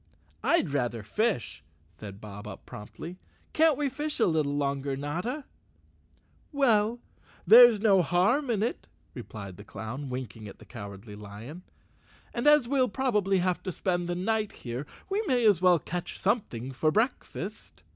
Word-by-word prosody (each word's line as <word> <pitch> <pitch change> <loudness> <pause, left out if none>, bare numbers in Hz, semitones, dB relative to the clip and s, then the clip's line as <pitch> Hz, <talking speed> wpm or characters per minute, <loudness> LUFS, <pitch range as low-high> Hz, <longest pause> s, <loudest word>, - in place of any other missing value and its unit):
"I'd 335 - +2
rather 120 -5 -1
fish," 160 - -1 0.3
said 100 -2 -10
Bob 105 +1 -9
Up 100 - -9
promptly. 165 - -9 0.2
" - - -36
Can't 315 -2 +4
we 290 -1 0
fish 295 +3 -4
a 225 - +5
little 155 -4 +1
longer, 140 -1 -1
Notta?" 180 - -3 1.1
"Well, 235 -5 +2 0.4
there's 235 -1 +9
no 200 -4 +5
harm 215 - +2
in 215 -3 +1
it," 235 - -3 0.3
replied 105 -6 -8
the 100 - -10
clown, 110 +7 -6
winking 120 -4 -6
at 100 - -11
the - - -15
Cowardly 100 -2 -9
Lion, 105 - -9 0.7
"and 240 +4 -1
as 295 -4 +6
we'll 260 -1 +2
probably 210 -4 +1
have 180 0 0
to 185 - -4
spend 175 0 -1
the 175 - -1
night 215 +3 0
here 125 +4 -5 0.2
we 395 +2 0
may 245 -3 +2
as 200 -5 +5
well 180 -1 +6
catch 175 +3 -5
something 160 - -1
for 145 +4 +1
breakfast." 205 - -3
175 Hz, 155 wpm, -28 LUFS, -, 1.1 s, there's